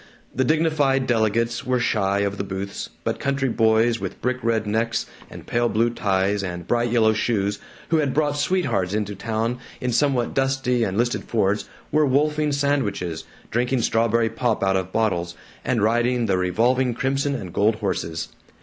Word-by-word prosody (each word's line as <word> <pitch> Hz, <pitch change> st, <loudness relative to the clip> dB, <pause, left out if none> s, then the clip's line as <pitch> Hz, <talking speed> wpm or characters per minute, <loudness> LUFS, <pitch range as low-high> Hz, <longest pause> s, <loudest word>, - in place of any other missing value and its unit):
The 130 Hz, -, +1 dB
dignified 150 Hz, -3 st, +2 dB
delegates 115 Hz, 0 st, +1 dB
were 125 Hz, 0 st, +1 dB
shy 100 Hz, -4 st, +1 dB
of 100 Hz, 0 st, -2 dB
the -, -, 0 dB
booths, 100 Hz, 0 st, -5 dB
but -, -, -2 dB
country 140 Hz, -1 st, 0 dB
boys 115 Hz, 0 st, +3 dB
with -, -, -5 dB
brickred 115 Hz, -3 st, 0 dB
necks 110 Hz, +2 st, 0 dB, 0.2 s
and -, -, -11 dB
pale 120 Hz, 0 st, +1 dB
blue 115 Hz, +2 st, +2 dB
ties 100 Hz, -2 st, 0 dB
and 90 Hz, -2 st, -5 dB
bright 120 Hz, +4 st, +1 dB
yellow 110 Hz, -2 st, +3 dB
shoes, 105 Hz, -2 st, 0 dB, 0.3 s
who 165 Hz, -, +3 dB
had 145 Hz, -3 st, +1 dB
brought 145 Hz, 0 st, +1 dB
sweethearts 140 Hz, -, 0 dB
into 105 Hz, -1 st, -2 dB
town 115 Hz, +4 st, -2 dB, 0.2 s
in 125 Hz, -, -1 dB
somewhat 130 Hz, -2 st, +1 dB
dusty 135 Hz, -2 st, +1 dB
and 95 Hz, -2 st, -1 dB
listed 120 Hz, +1 st, 0 dB
Fords, 105 Hz, -2 st, 0 dB, 0.2 s
were 155 Hz, +1 st, +3 dB
wolfing 150 Hz, +2 st, +2 dB
sandwiches, 110 Hz, -, -1 dB, 0.3 s
drinking 125 Hz, +1 st, +1 dB
strawberry 115 Hz, 0 st, +2 dB
pop 115 Hz, -2 st, 0 dB
out 95 Hz, 0 st, +2 dB
of 95 Hz, -1 st, -2 dB
bottles, 90 Hz, -6 st, 0 dB, 0.3 s
and 115 Hz, -, 0 dB
riding 120 Hz, +2 st, +2 dB
the 100 Hz, -3 st, +1 dB
revolving 120 Hz, +7 st, +1 dB
crimson 140 Hz, +2 st, 0 dB
and 90 Hz, -9 st, -6 dB
gold 105 Hz, +2 st, +3 dB
horses. 95 Hz, -6 st, -3 dB
115 Hz, 165 wpm, -23 LUFS, 100-130 Hz, 0.3 s, boys